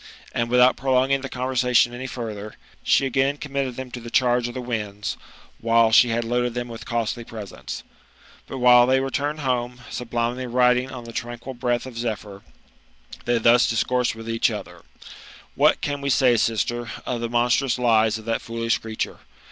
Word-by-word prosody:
And 115 0 -1
wiUiout 125 +1 +5
prolonging 135 +1 +2
the 135 - -6
conversation 125 -1 +2
any 130 +2 -5
further, 110 -4 -6 0.3
she 135 - +3
again 135 +2 +1
committed 140 -3 -3
them 130 -1 -7
to 125 - -6
the 115 0 -9
charge 120 -1 +2
of 120 - -8
the - - -3
winds, 105 -4 -4 0.5
after 115 -1 +4
she 120 +1 +7
had 115 +1 0
loaded 120 +1 -1
thera 120 0 -3
with 115 -1 -9
costly 115 0 -2
presents. 110 -3 -8 0.6
But 135 - -6
while 125 -1 +6
they 130 +1 +3
return 140 +3 -2
home, 125 -3 -2
sublimely 120 +1 -2
riding 125 +1 +3
on 130 -2 -8
the 115 0 -10
tranquil 120 +3 -5
breath 120 0 -1
of 130 - -8
2^phyr, 110 -4 -5 0.8
they 120 0 +2
thus 115 +1 +4
discoursed 125 +1 0
with 115 0 -9
each 115 0 +1
other: - - -7 0.7
'^What - - +3
can 145 -1 -2
we 140 - -2
say, 130 -2 +4
sister, 120 +2 0 0.2
of 120 -2 -3
the 115 - -2
monstrous 120 +2 +2
lies 110 -3 +3
of 110 - -12
that 115 0 -1
foolish 115 0 -1
creature 110 -1 -5
120 Hz, 175 wpm, -23 LUFS, 115-130 Hz, 0.8 s, she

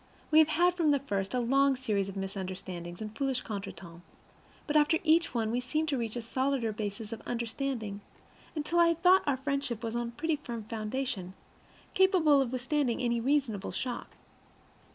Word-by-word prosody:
We 310 - +7
have 315 - +7
had 350 +3 +3
from 335 -3 +2
the 285 - +5
first 200 -5 -2
a - - +2
long 275 +3 +3
series 210 -6 -1
of 195 - -7
misunderstandings 185 -2 -5
and 215 0 -7
foolish 270 -3 -1
contretemps, 195 -5 -7 0.6
but 295 - -2
after 300 +2 +5
each 330 -3 +3
one 225 -2 0
we 245 - +1
seemed 305 +6 -1
to 280 - 0
reach 230 -1 -3
a 240 - -4
solider 260 -1 0
basis 210 +1 -5
of 225 - -7
understanding, 235 -3 -3 0.5
until 310 +3 0
I 340 - +7
had 335 0 0
thought 370 +1 +7
our 280 -2 +2
friendship 270 -4 -2
was 225 0 -3
on 240 0 -1
a - - -6
pretty 325 -2 0
firm 235 -6 -6
foundation, 215 -3 -4 0.6
capable 345 -7 +5
of 250 -3 -1
withstanding 260 -1 0
any 235 -2 +1
reasonable 250 -6 0
shock. 250 -2 -5
250 Hz, 180 wpm, -30 LUFS, 215-295 Hz, 0.6 s, We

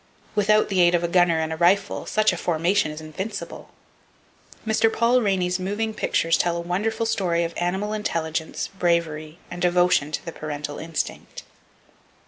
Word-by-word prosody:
Without 215 0 +3
the 190 -2 +2
aid 175 0 +5
of 175 - 0
a - - +1
gunner 175 -1 +3
and 160 0 -2
a - - -5
rifle, 195 +4 +2
such 215 -2 +2
a - - -4
formation 175 +2 +1
is 155 +1 -7
invincible! 155 +7 -6 1.0
Mr. 220 0 +2
Paul 235 +2 +3
Rainey's 185 -3 0
moving 205 +4 -2
pictures 165 -5 +1
tell 170 -1 +1
a - - -3
wonderful 210 +6 -1
story 180 -6 0
of 170 0 -3
animal 190 +4 -1
intelligence, 160 -6 -2
bravery 170 -4 -1
and 175 0 -6
devotion 175 -3 +3
to - - -3
the 165 - -5
parental 145 -2 -5
instinct. 165 -1 -5
175 Hz, 160 wpm, -24 LUFS, 165-205 Hz, 1.0 s, aid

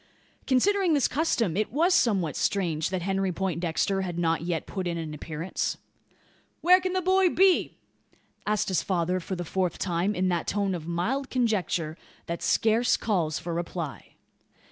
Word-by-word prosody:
Considering 365 +6 +3
this 280 - +3
custom, 240 - 0
it 215 +2 -1
was 335 +8 +3
somewhat 195 - +2
strange, 165 -6 0
that 185 -2 -3
Henry 195 0 0
Poindexter 180 +1 -1
had 175 -3 -4
not 165 -2 +1
yet 170 -1 -2
put 190 -3 -4
in 170 -1 -2
an 160 -2 -5
appearance. 155 +4 -3 0.8
"Where 365 +2 +6
can 370 0 -2
the 370 -1 0
boy 375 0 +4
be?" 375 +1 +3 0.7
asked 210 -1 +1
his 185 - +1
father, 180 -1 0
for 185 +2 -5
the 175 -1 -5
fourth 185 0 -1
time, 180 +3 0
in 185 +1 +1
that 175 -2 -1
tone 200 -2 0
of 165 -3 -5
mild 235 +12 -1
conjecture 190 -10 0 0.3
that 170 0 -4
scarce 225 +2 +2
calls 170 -8 0
for 170 - -5
reply. 170 -3 -5
185 Hz, 165 wpm, -27 LUFS, 170-240 Hz, 0.8 s, Where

